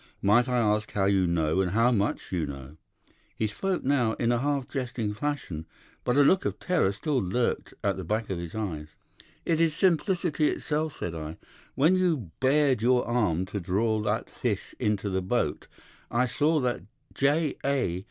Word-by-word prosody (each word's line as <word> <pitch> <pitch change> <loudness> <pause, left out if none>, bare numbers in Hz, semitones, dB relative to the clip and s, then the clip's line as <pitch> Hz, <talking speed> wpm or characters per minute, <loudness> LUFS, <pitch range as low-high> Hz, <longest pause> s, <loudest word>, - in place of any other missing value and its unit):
Might 120 +6 +4
I 125 - +1
ask 105 -2 +1
how 100 -2 +1
you 95 -2 +3
know, 85 +1 +1
and 90 -1 -1
how 115 +3 +4
much 105 -3 -1
you 85 -4 -1
know?' 70 +1 -8 0.6
He 110 - -1
spoke 180 - -2
now 130 -5 +2
in 115 +1 0
a 120 - +2
half 140 -1 -1
jesting 120 -5 -3
fashion, 105 - -4 0.4
but 125 +2 +1
a 145 - +7
look 185 +7 +4
of - - -2
terror 180 - +1
still 140 +7 -1
lurked 115 +6 -1
at 100 -2 +1
the 95 - -5
back 105 +4 -2
of 90 - -2
his 85 +1 -7
eyes. 85 -9 -4 0.6
"'It 165 -1 +1
is 160 -2 +2
simplicity 175 -3 +2
itself,' 155 0 -2
said 85 - -4
I. 80 -1 -6 0.4
'When 160 +7 +4
you 160 - 0
bared 135 -2 +3
your 125 +1 +3
arm 105 -8 +1
to 100 +2 -4
draw 105 +5 0
that 105 - -1
fish - - -3
into 105 -1 0
the 95 -1 0
boat 95 +7 -1 0.4
I 120 +2 +2
saw 150 +5 +1
that 125 -5 -1 0.3
J. 145 +2 +1
A. 130 -11 0
115 Hz, 180 wpm, -27 LUFS, 95-145 Hz, 0.6 s, a